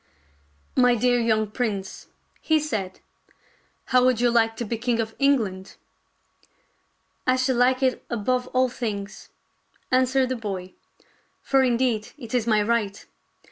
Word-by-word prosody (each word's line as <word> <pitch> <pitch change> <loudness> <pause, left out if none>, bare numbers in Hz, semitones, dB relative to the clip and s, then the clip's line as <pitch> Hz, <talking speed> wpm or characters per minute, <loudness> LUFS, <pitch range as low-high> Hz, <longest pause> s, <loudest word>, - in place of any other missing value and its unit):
" 75 0 -38
My 245 -1 +4
dear 245 +1 +2
young 220 -2 +1
prince," 210 -5 -4 0.3
he 315 -1 +2
said, 215 -11 -4 0.4
" - - -37
how 250 0 +6
would 255 -2 +3
you 240 0 +3
like 225 -1 +2
to 235 - -4
be 230 - -2
king 240 -1 0
of 220 -1 -2
England.? 220 -10 0 0.5
" - - -38
" - - -45
I 255 - +4
should 255 -1 0
like 255 +2 +3
it 260 -1 +1
above 250 +2 -1
all 255 0 +2
things," 210 -5 -6 0.6
answered 255 0 +2
the 260 - -1
boy, 195 -5 -6 0.7
"for 270 -1 +3
indeed 240 -3 0
it 235 -5 -10
is 240 -2 0
my 215 -2 +3
right. 210 -3 -1
235 Hz, 155 wpm, -24 LUFS, 215-255 Hz, 0.7 s, how